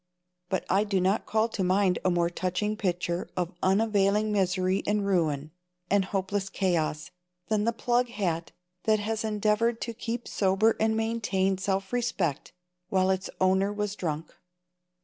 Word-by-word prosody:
But 190 - -1
I 195 +3 +3
do 200 -3 0
not 190 +4 +1
call 220 +1 +2
to 205 -4 -2
mind 185 0 +2
a 185 - +3
more 175 -1 +1
touching 185 +4 -1
picture 180 -3 -2
of 180 -1 -1
unavailing 205 +1 +2
misery 185 -1 +1
and 205 0 +1
ruin, 155 -6 0 0.4
and 200 -1 +3
hopeless 195 0 -2
chaos, 165 -6 -1 0.4
than 215 -1 +1
the 230 - +3
plug 240 +1 +1
hat 175 -7 -2 0.3
that 215 -1 +4
has 220 +1 -2
endeavored 215 +2 +1
to 230 - -3
keep 235 +1 -4
sober 200 +3 +2
and 220 0 +2
maintain 205 -4 0
self 195 +2 -2
respect 230 - -1 0.4
while 190 0 +3
its 190 0 -2
owner 190 +2 +3
was 205 -1 -2
drunk. 160 -3 -4
195 Hz, 150 wpm, -28 LUFS, 185-215 Hz, 0.4 s, that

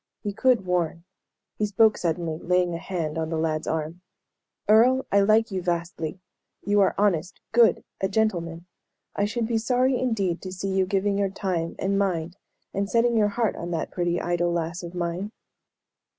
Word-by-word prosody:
He 205 -2 -3
could 245 -2 +2
warn. 170 -2 -1 0.6
He 210 - +1
spoke 215 +1 +4
suddenly, 165 -2 -2
laying 180 0 +1
a 165 - -3
hand 165 -3 -3
on 160 0 -2
the 165 - -2
lad's 155 -1 -1
arm. 160 +2 -3 0.7
"Earle, 245 +5 +5
I 200 - +5
like 215 +2 +3
you 190 -1 -2
vastly. 170 -1 -3 0.5
You 205 0 +3
are 195 - +3
honest, 185 -4 +1
good, 235 -1 +4 0.2
a 190 - +1
gentleman. 175 -6 -1 0.5
I 205 - +1
should 230 +2 -1
be 225 0 0
sorry 250 +2 +2
indeed 200 -9 0
to 185 - -6
see 190 +1 -4
you 190 -1 +1
giving 200 +1 0
your 200 -1 +1
time, 180 -4 -2
and 195 +1 0
mind, 175 -2 -1 0.4
and 200 +1 -1
setting 235 +1 +2
your 215 -2 +4
heart 215 +1 0
on 170 - -5
that 165 -2 -2
pretty, 175 -1 0
idle 175 0 0
lass 170 0 -2
of 175 0 -8
mine." 175 +4 -3
185 Hz, 180 wpm, -25 LUFS, 170-210 Hz, 0.7 s, Earle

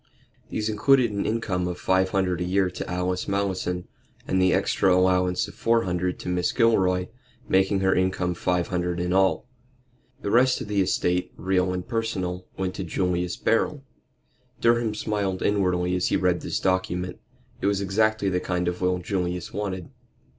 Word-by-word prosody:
These 110 - -2
included 120 +3 +3
an 100 -1 -2
income 100 -5 -1
of 90 0 -4
five 95 0 +2
hundred 95 -2 0
a - - +1
year 95 +1 +1
to - - -6
Alice 90 +1 -2
Malleson, 95 -2 -1 0.4
and 95 - +1
the 95 0 +4
extra 95 - +2
allowance 90 +1 +2
of 100 - -11
four 115 0 +2
hundred 90 0 -1
to - - -8
Mrs. 90 -1 0
Gilroy, 95 -6 +3 0.4
making 95 +1 +2
her 95 0 +3
income 95 -1 0
five 90 0 -1
hundred 90 -1 -1
in 90 +1 -1
all. 95 0 +2 0.8
The 100 - -1
rest 125 +2 +4
of - - -6
the 100 -1 +1
estate, 90 -1 0
real 95 0 +1
and 90 -1 -4
personal, 95 -6 -3
went 95 -1 -2
to - - -3
Julius 90 0 -1
Beryl. 135 +5 0 0.8
Durham 115 -2 +2
smiled 100 -3 -2
inwardly 90 -3 +1
as 90 - +1
he - - +1
read 90 -1 +1
this - - -2
document. 90 -1 -1 0.4
It - - +1
was 100 -1 +1
exactly 105 +2 +1
the 90 -1 0
kind 90 -1 -2
of 90 +1 -2
will 90 0 +2
Julius 90 -1 -3
wanted. 95 -4 -4
95 Hz, 170 wpm, -25 LUFS, 90-100 Hz, 0.8 s, the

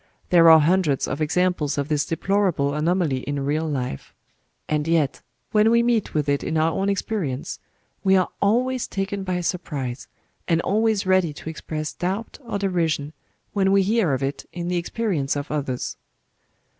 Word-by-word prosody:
There 165 -2 +7
are 160 0 +9
hundreds 160 -3 +2
of 145 - -3
examples 160 -2 +1
of 140 -1 -1
this 150 -1 0
deplorable 170 -5 +1
anomaly 160 -2 +1
in 140 +1 -3
real 155 +3 0
life; 125 - -4 0.5
and 150 0 -1
yet, 160 -4 +1 0.3
when 215 +1 +4
we 235 0 +4
meet 235 -6 0
with 150 -1 +1
it 140 0 +1
in 160 - -1
our 160 +1 +3
own 195 +4 0
experience, 185 -9 -2 0.4
we 190 -1 +4
are 185 - +1
always 250 +5 +1
taken 195 0 -3
by 180 -1 -1
surprise, 145 -8 -3 0.4
and 165 -2 +2
always 215 +1 +1
ready 185 -4 +2
to 160 - -7
express 155 0 -5
doubt 190 +5 -3
or 235 -5 -4
derision 165 -6 -1 0.4
when 195 -1 +2
we 195 0 +4
hear 195 -8 +2
of 130 - -4
it 135 +1 -3
in 175 0 -4
the 180 - 0
experience 170 -6 -1
of 145 +1 -4
others. 140 -4 -3
170 Hz, 170 wpm, -23 LUFS, 145-195 Hz, 0.5 s, are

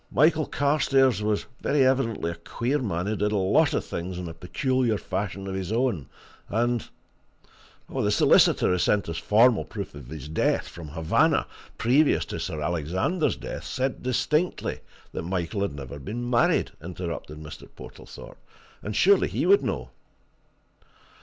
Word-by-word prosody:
"Michael 155 +2 +3
Carstairs 135 -5 +2
was 105 -1 0 0.2
very 140 -2 +3
evidently 115 -9 +1
a - - -6
queer 120 - -2
man 90 -8 -2
who 110 +2 -1
did 105 0 0
a 105 - +1
lot 95 -1 +3
of - - -1
things 90 +1 -5
in 90 -1 -5
a 80 - -6
peculiar 120 - 0
fashion 95 0 -4
of 95 - -4
his 95 0 -4
own, 115 - 0 0.4
and 120 +1 0 0.5
" - - -28
"The - - -1
solicitor - - +4
who 90 - +1
sent 105 +3 +2
us 85 0 -3
formal 115 +2 +4
proof 100 -3 -7
of 70 -4 -10
his 75 -1 -8
death, 80 - 0
from 85 -3 -9
Havana, 80 +2 +2 0.3
previous 140 +6 +3
to - - -5
Sir 75 -1 -4
Alexander's 85 - 0
death, - - -7
said 130 +1 -2
distinctly 150 +7 0 0.3
that - - -4
Michael 90 +2 -2
had 100 -8 -1
never 70 0 -8
been 120 +10 -5
married," 120 -1 +2
interrupted 85 -3 -6
Mr. 75 -1 -10
Portlethorpe. - - -12 0.4
"And 105 0 -5
surely 200 - +5
he - - -1
would 400 +1 +5
know!" - - -3
105 Hz, 160 wpm, -26 LUFS, 85-130 Hz, 0.5 s, surely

